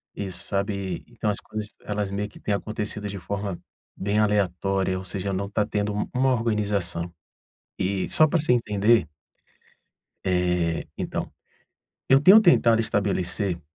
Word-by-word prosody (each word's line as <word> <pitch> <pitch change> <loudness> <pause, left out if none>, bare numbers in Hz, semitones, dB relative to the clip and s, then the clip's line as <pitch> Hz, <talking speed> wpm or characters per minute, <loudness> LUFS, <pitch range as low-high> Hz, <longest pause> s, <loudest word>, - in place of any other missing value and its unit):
isso, 95 -3 -5
sabe. 100 -2 -2
Então, 115 -2 -5
as 100 - -1
coisas 105 -1 -7
elas 105 -1 -3
meio 105 +1 -3
que - - -15
têm 105 - -1
acontecido 105 0 -3
de 100 - -6
forma 100 -1 -4 0.4
bem 100 +2 0
aleatória, 95 -2 +1
ou - - -8
seja, 100 +1 -3
não 100 +1 -2
está 105 +1 0
tendo 105 -1 -1
u 105 - -2
uma 130 +1 +3
organização. 105 -7 0 0.7
E 95 0 -1
só 155 - +5
para 165 +3 +1
você 155 - +2
entender 105 -5 +2 1.2
eh, 90 -2 +1
então, - - -4 0.8
eu 135 - +7
tenho 190 +9 +8
tentado 120 - +5
estabelecer 95 -3 0
100 Hz, 145 wpm, -25 LUFS, 95-110 Hz, 1.2 s, tenho